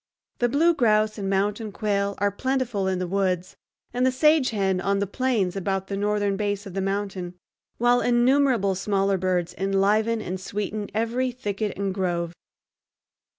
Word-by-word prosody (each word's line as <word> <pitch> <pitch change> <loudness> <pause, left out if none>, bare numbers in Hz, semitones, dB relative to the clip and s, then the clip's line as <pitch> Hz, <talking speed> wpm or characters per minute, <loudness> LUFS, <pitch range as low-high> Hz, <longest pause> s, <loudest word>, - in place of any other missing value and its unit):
The 240 - +2
blue 320 +7 +4
grouse 215 -5 +2
and 195 -1 -2
mountain 205 +3 0
quail 200 -1 -1
are 205 +1 +1
plentiful 240 -3 -1
in 190 -1 0
the 180 - -2
woods 185 -1 -1 0.4
and 250 - 0
the 260 - +4
sage 300 +1 +4
hen 195 -4 0
on 200 +1 +1
the 200 - 0
plains 205 -4 0
about 195 0 -2
the 200 - -2
northern 205 0 0
base 205 0 -2
of 195 - -8
the 195 - -2
mountain, 195 -2 -3 0.4
while 245 +1 +3
innumerable 245 -4 +3
smaller 195 0 0
birds 180 -1 0
enliven 205 +4 +2
and 190 -3 -4
sweeten 205 +1 -4
every 235 +4 0
thicket 215 -4 -3
and 195 -1 -1
grove. 175 -3 -2
200 Hz, 160 wpm, -25 LUFS, 195-230 Hz, 0.4 s, blue